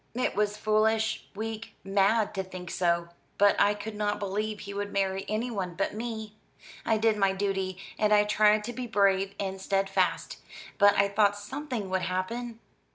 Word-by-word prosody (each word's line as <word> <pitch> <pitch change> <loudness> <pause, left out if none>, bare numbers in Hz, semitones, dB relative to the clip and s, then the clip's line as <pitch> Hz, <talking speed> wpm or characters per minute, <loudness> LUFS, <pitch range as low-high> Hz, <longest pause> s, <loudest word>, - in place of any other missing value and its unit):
"It 250 - 0
was 210 0 0
foolish, 220 +1 +1
weak, 220 +1 -5
mad 200 +3 +2
to 195 - -1
think 185 -2 -8
so. 170 -1 +1 0.3
But 205 0 +5
I 205 +1 +4
could 215 +1 -6
not 210 0 -1
believe 210 +2 -3
he 200 - -7
would 205 0 -3
marry 195 -1 -1
anyone 215 -5 -2
but 195 - -1
me. 220 -1 -5 0.5
I 225 - +2
did 220 0 +2
my 195 -1 +3
duty, 195 -1 -2 0.2
and 210 0 +2
I 210 0 +6
tried 210 0 +3
to 240 +3 -5
be 250 0 -5
brave 200 -2 +2
and 190 -1 -3
steadfast. 195 0 0 0.4
But 205 -1 +6
I 200 - +4
thought 205 0 +2
something 235 -2 -5
would 190 0 +1
happen." 225 +6 -3
205 Hz, 170 wpm, -28 LUFS, 195-220 Hz, 0.5 s, I